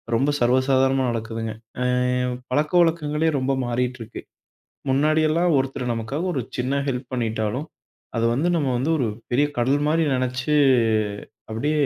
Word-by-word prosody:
ரொம்ப 135 Hz, +5 st, +2 dB
சர்வ 125 Hz, +2 st, +3 dB
சாதாரணமா 135 Hz, 0 st, +3 dB
நடக்குதுங்க. 115 Hz, -1 st, -4 dB, 0.3 s
ஆவ் 125 Hz, 0 st, +1 dB, 0.2 s
பழக்கவழக்கங்களே 155 Hz, +1 st, +2 dB
ரொம்ப 130 Hz, +1 st, 0 dB
மாறிட்டுருக்கு. 120 Hz, -1 st, -3 dB, 0.7 s
முன்னாடி 150 Hz, +4 st, +3 dB
எல்லாம் 170 Hz, +3 st, +2 dB
ஒருத்தரு 135 Hz, -1 st, -2 dB
நமக்காக 125 Hz, +9 st, -3 dB
ஒரு 130 Hz, -, 0 dB, 0.2 s
சின்ன 130 Hz, +3 st, 0 dB
ஹெல்ப் 130 Hz, -1 st, -3 dB
பண்ணிட்டாலும், 115 Hz, +3 st, -2 dB, 0.5 s
அது 115 Hz, -, +1 dB
வந்து 150 Hz, +8 st, +1 dB
நம்ம 145 Hz, -5 st, 0 dB
வந்து 135 Hz, +6 st, 0 dB
ஒரு 130 Hz, -, +1 dB, 0.2 s
பெரிய 140 Hz, +4 st, +3 dB
கடல் 135 Hz, +4 st, +2 dB
மாரி 160 Hz, +1 st, +2 dB
நினைச்சு 125 Hz, +3 st, -1 dB, 1.0 s
அப்டியே, 150 Hz, +6 st, +1 dB
130 Hz, 130 wpm, -23 LUFS, 125-150 Hz, 1.0 s, சர்வ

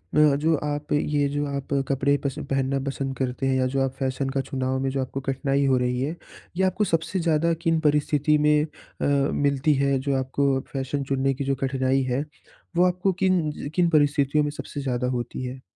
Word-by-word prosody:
म 150 Hz, -2 st, +5 dB
जो 160 Hz, 0 st, +3 dB
आप 150 Hz, 0 st, -3 dB
ये 145 Hz, -1 st, +1 dB
जो 145 Hz, +1 st, -1 dB
आप 140 Hz, 0 st, -4 dB
कपड़े 140 Hz, +1 st, +2 dB
पसंद 140 Hz, +1 st, -3 dB
पहनना 135 Hz, 0 st, 0 dB
पसंद 135 Hz, -1 st, -3 dB
करते 130 Hz, 0 st, -2 dB
हैं 130 Hz, -, +2 dB
या 130 Hz, -, +2 dB
जो 135 Hz, +1 st, -1 dB
आप 135 Hz, -, 0 dB
फैशन 135 Hz, 0 st, -1 dB
का 135 Hz, 0 st, -1 dB
चुनाव 130 Hz, 0 st, -2 dB
में 135 Hz, 0 st, 0 dB
जो 135 Hz, 0 st, -1 dB
आपको 130 Hz, +1 st, -4 dB
कठिनाई 135 Hz, +1 st, 0 dB
हो 130 Hz, -1 st, +3 dB
रही 125 Hz, 0 st, 0 dB
है, 155 Hz, +5 st, -2 dB, 0.4 s
ये 190 Hz, -, +2 dB
आपको 190 Hz, +3 st, +1 dB
सबसे 165 Hz, +1 st, 0 dB
ज़्यादा 165 Hz, 0 st, +2 dB
किन 165 Hz, -2 st, +2 dB
परिस्थिति 150 Hz, 0 st, +2 dB
में 150 Hz, 0 st, +3 dB
अ, -, -, -4 dB, 0.6 s
मिलती 145 Hz, +1 st, +2 dB
है 140 Hz, 0 st, +2 dB
जो 140 Hz, 0 st, -1 dB
आपको 135 Hz, +1 st, +1 dB
फैशन 135 Hz, +1 st, -2 dB
चुनने 135 Hz, 0 st, 0 dB
की 140 Hz, +2 st, -4 dB
जो 135 Hz, 0 st, 0 dB
कठिनाई 135 Hz, 0 st, +1 dB
है, 130 Hz, +2 st, -1 dB, 0.5 s
वो 175 Hz, -, +4 dB
आपको 180 Hz, +2 st, +1 dB
किन 185 Hz, -2 st, +3 dB
ज 145 Hz, -, -6 dB
किन 175 Hz, -2 st, +3 dB
परिस्थितियों 145 Hz, -1 st, +3 dB
में 145 Hz, -, -1 dB
सबसे 145 Hz, -1 st, -6 dB
ज़्यादा 125 Hz, -2 st, -1 dB
होती 120 Hz, +2 st, -5 dB
है? 130 Hz, +1 st, -6 dB
140 Hz, 205 wpm, -25 LUFS, 135-150 Hz, 0.6 s, म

